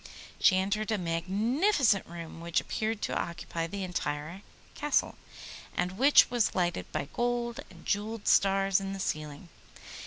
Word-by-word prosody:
She 185 Hz, -, +5 dB
entered 210 Hz, +3 st, 0 dB
a 215 Hz, -, +2 dB
magnificent 205 Hz, -, +1 dB
room 165 Hz, -1 st, -8 dB
which 170 Hz, 0 st, +1 dB
appeared 220 Hz, 0 st, -3 dB
to -, -, -1 dB
occupy 170 Hz, -1 st, -3 dB
the 195 Hz, +3 st, -5 dB
entire 170 Hz, 0 st, -4 dB, 0.3 s
Castle, 295 Hz, 0 st, +1 dB, 0.6 s
and 180 Hz, -, 0 dB
which 260 Hz, +7 st, +5 dB
was 240 Hz, -3 st, +1 dB
lighted 175 Hz, -2 st, -1 dB
by 140 Hz, -, -3 dB
gold 240 Hz, +1 st, -1 dB
and -, -, -16 dB
jewelled 210 Hz, +1 st, -2 dB
stars 195 Hz, 0 st, +4 dB
in 195 Hz, 0 st, -4 dB
the 195 Hz, -, -6 dB
ceiling. 155 Hz, -2 st, -4 dB
195 Hz, 145 wpm, -29 LUFS, 170-225 Hz, 0.6 s, She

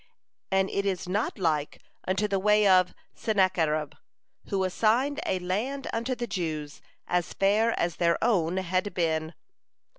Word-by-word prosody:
And 190 Hz, 0 st, +2 dB
it 200 Hz, -, 0 dB
is 190 Hz, -2 st, -2 dB
not 205 Hz, +6 st, -1 dB
like 155 Hz, -6 st, -1 dB, 0.3 s
unto 190 Hz, +3 st, +1 dB
the 195 Hz, -1 st, 0 dB
way 210 Hz, +1 st, +4 dB
of 185 Hz, -1 st, +4 dB, 0.2 s
Sennacherib, 175 Hz, -, +1 dB, 0.6 s
who 195 Hz, -1 st, 0 dB
assigned 235 Hz, +10 st, +1 dB
a 185 Hz, -, +1 dB
land 215 Hz, +10 st, -3 dB
unto 235 Hz, +3 st, -1 dB
the 245 Hz, -, -3 dB
Jews 155 Hz, -8 st, -4 dB, 0.3 s
as 175 Hz, -2 st, -1 dB
fair 215 Hz, +4 st, +2 dB
as 170 Hz, -1 st, -1 dB
their 170 Hz, -1 st, +2 dB
own 185 Hz, -7 st, +2 dB
had 185 Hz, +1 st, -1 dB
been. 160 Hz, -1 st, -1 dB
190 Hz, 145 wpm, -27 LUFS, 170-210 Hz, 0.6 s, way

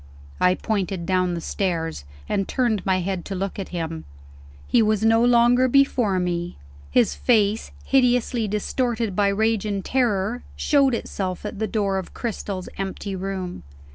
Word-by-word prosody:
I 180 Hz, 0 st, +4 dB
pointed 195 Hz, -5 st, -2 dB
down 185 Hz, -1 st, +1 dB
the 170 Hz, -, -4 dB
stairs, 165 Hz, -, -2 dB, 0.2 s
and 195 Hz, -, -1 dB
turned 230 Hz, -7 st, 0 dB
my 185 Hz, -1 st, +2 dB
head 185 Hz, -1 st, -3 dB
to 195 Hz, -, -4 dB
look 195 Hz, +2 st, -3 dB
at 195 Hz, -, -5 dB
him. 165 Hz, -2 st, -4 dB, 0.6 s
He 240 Hz, -, +4 dB
was 215 Hz, 0 st, +2 dB
no 225 Hz, +1 st, +5 dB
longer 245 Hz, +1 st, +5 dB
before 245 Hz, -7 st, +3 dB
me. 175 Hz, -1 st, -2 dB, 0.3 s
His 240 Hz, -4 st, +3 dB
face, 220 Hz, -2 st, +2 dB, 0.2 s
hideously 250 Hz, -3 st, +2 dB
distorted 225 Hz, 0 st, -1 dB
by 205 Hz, 0 st, +3 dB
rage 220 Hz, +1 st, +1 dB
and 200 Hz, -3 st, -3 dB
terror, 235 Hz, -2 st, 0 dB
showed 275 Hz, -4 st, +3 dB
itself 190 Hz, -4 st, -4 dB
at 205 Hz, -, -5 dB
the 220 Hz, -, 0 dB
door 195 Hz, -2 st, 0 dB
of 185 Hz, -, -9 dB
Cristel's 200 Hz, -5 st, -4 dB
empty 195 Hz, 0 st, -4 dB
room. 190 Hz, -, -4 dB
200 Hz, 155 wpm, -23 LUFS, 185-235 Hz, 0.6 s, no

